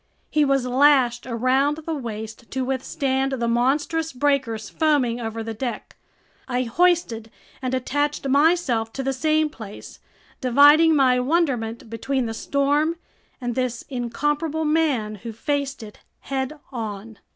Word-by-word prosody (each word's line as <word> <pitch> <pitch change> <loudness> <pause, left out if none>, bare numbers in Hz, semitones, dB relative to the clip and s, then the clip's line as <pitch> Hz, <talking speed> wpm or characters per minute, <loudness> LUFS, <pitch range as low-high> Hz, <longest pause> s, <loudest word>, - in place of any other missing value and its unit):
He 300 - +3
was 275 -2 +2
lashed 255 -2 +3
around 260 +5 +1
the 320 +1 -4
waist 225 -4 -6
to 260 -1 -2
withstand 265 +1 -1
the 235 -3 -1
monstrous 290 +7 0
breakers 250 -5 0
foaming 265 -7 +1
over 225 0 -4
the 225 0 -5
deck. 240 +2 -5 0.5
I 250 -1 0
hoisted 245 -5 +1 0.3
and 260 0 -1
attached 290 +3 -1
myself 280 -6 +2
to 270 - -4
the 270 0 0
same 310 +3 +2
place, 220 -8 -10 0.4
dividing 290 +5 +6
my 255 -3 +4
wonderment 250 -6 0
between 245 +3 -2
the 225 - -3
storm 285 +6 +1 0.4
and 245 -2 -3
this 250 -1 -2
incomparable 295 +5 -1
man 285 -9 +1
who 230 - -6
faced 275 +2 -2
it 210 -1 -12 0.2
head 270 +2 -3
on. 220 -3 -6
265 Hz, 135 wpm, -23 LUFS, 235-290 Hz, 0.5 s, dividing